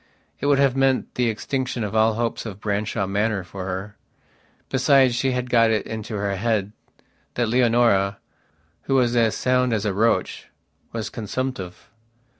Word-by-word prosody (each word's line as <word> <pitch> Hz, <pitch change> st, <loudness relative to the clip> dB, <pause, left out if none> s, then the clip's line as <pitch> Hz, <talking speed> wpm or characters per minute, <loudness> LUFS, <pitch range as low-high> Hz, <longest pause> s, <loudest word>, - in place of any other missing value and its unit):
It -, -, -1 dB
would 145 Hz, -1 st, +4 dB
have 135 Hz, -2 st, +3 dB
meant 135 Hz, -1 st, +1 dB
the 125 Hz, -2 st, +1 dB
extinction 125 Hz, +2 st, -3 dB
of 105 Hz, +1 st, -4 dB
all 110 Hz, 0 st, +3 dB
hopes 115 Hz, 0 st, -2 dB
of 105 Hz, -3 st, -7 dB
Branshaw 105 Hz, -1 st, -1 dB
Manor 100 Hz, 0 st, -1 dB
for 90 Hz, +1 st, -7 dB
her. 95 Hz, +3 st, -5 dB, 0.7 s
Besides 135 Hz, -1 st, +4 dB
she 130 Hz, +2 st, 0 dB
had 125 Hz, 0 st, -2 dB
got 115 Hz, -2 st, +4 dB
it 110 Hz, -2 st, 0 dB
into 110 Hz, 0 st, -5 dB
her 100 Hz, -1 st, -1 dB
head 105 Hz, -1 st, 0 dB, 0.6 s
that 120 Hz, -1 st, +1 dB
Leonora, 115 Hz, -5 st, +3 dB, 0.7 s
who 135 Hz, -, +1 dB
was 125 Hz, -2 st, +2 dB
as 115 Hz, -2 st, +2 dB
sound 125 Hz, -1 st, +1 dB
as 110 Hz, -2 st, -1 dB
a 100 Hz, -, 0 dB
roach, 115 Hz, +4 st, 0 dB, 0.4 s
was 115 Hz, -1 st, -4 dB
consumptive. 115 Hz, -4 st, -5 dB
115 Hz, 160 wpm, -23 LUFS, 105-125 Hz, 0.7 s, would